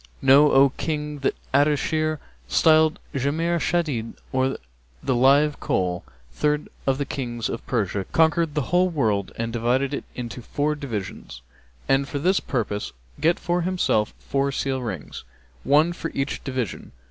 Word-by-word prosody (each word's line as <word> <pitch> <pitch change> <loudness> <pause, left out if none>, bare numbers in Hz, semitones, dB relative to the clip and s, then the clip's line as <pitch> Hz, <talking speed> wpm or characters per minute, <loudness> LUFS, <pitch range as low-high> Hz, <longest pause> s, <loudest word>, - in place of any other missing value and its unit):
And - - -7
know, 145 +2 +7
O 135 +1 +6
King, 150 -2 -3
that 135 - 0 0.2
Ardeshir, 155 +2 +2 0.3
styled 155 - +4 0.2
Jamr 160 +5 0
Shadíd, 145 -11 -1 0.2
or 130 0 0 0.5
the 130 - +1
Live 140 +4 +4
Coal, 90 -1 -1 0.3
third 150 - 0 0.2
of 135 -1 +2
the 140 - -2
Kings 120 -4 -3
of 115 - -5
Persia, 100 -5 -1
conquered 160 -1 +2
the 150 +1 -2
whole 180 +1 +4
world 110 - 0
and 115 0 -3
divided 125 +4 +1
it - - -4
into 125 0 -6
four 145 +5 -1
divisions 105 - -6 0.4
and, 135 +1 +2
for 145 - -4
this 185 +7 +2
purpose, 105 -5 -3 0.3
get 165 +4 +3
for 175 +1 -1
himself 175 -12 0
four 140 0 -1
seal 135 -1 -2
rings, 95 - -6 0.4
one 155 +5 +4
for 165 - -5
each 135 +1 -2
division. 130 -7 -4
140 Hz, 150 wpm, -24 LUFS, 120-155 Hz, 0.5 s, know